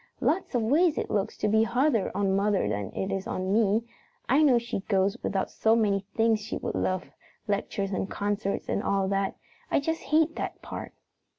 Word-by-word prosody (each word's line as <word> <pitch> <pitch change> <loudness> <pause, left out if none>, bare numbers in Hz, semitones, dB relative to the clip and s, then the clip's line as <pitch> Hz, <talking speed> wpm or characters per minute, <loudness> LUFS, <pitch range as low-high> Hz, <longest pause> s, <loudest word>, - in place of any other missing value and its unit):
"Lots 340 -5 0
of 235 - +2
ways 305 +8 +3
it - - -2
looks 205 0 -1
to - - 0
be 220 +1 +4
harder 235 -1 +2
on 195 -1 +1
mother 200 - +2
than 100 -2 -2
it 190 +1 -2
is 195 +2 -4
on 190 -5 -2
me. 220 0 +3 0.4
I 275 +5 +4
know 275 -5 +5
she 235 -3 -2
goes 195 0 +2
without 195 -1 -1
so 220 0 +3
many 200 -3 +1
things 225 -1 +3
she 210 +2 -5
would - - -4
love 185 -1 -1 0.4
lectures 200 -1 -1
and 190 0 -2
concerts 205 0 -2
and - - 0
all 195 -2 +1
that. 195 0 0 0.3
I - - +3
just 325 +3 -2
hate 320 +1 +2
that - - -4
part!" - - -7
210 Hz, 195 wpm, -27 LUFS, 195-235 Hz, 0.4 s, know